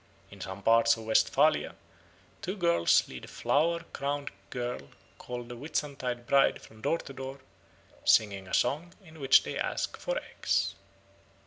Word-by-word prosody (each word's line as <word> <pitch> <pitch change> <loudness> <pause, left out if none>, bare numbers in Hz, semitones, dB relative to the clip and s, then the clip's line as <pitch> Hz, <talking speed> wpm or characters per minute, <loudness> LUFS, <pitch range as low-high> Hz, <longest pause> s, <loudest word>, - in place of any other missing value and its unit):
In 100 -1 -12
some 95 +1 -7
parts 115 +1 +5
of 115 - -8
Westphalia 110 0 +3 0.7
two 190 +3 -4
girls 170 - +3
lead 65 -1 -9
a - - -15
flower 165 +3 +1
crowned 140 0 -2 0.2
girl 120 - -4 0.3
called 120 -1 -6
the 120 - -7
Whitsuntide 130 -3 -3
Bride 140 +2 +4
from 110 0 -16
door 165 - +1
to 135 - -10
door, 135 +1 -7 0.6
singing 100 -3 +3
a - - -10
song 160 +8 0
in 160 -2 -14
which 135 -1 +6
they - - -4
ask - - -2
for - - -2
eggs. - - -1
130 Hz, 150 wpm, -30 LUFS, 115-150 Hz, 0.7 s, which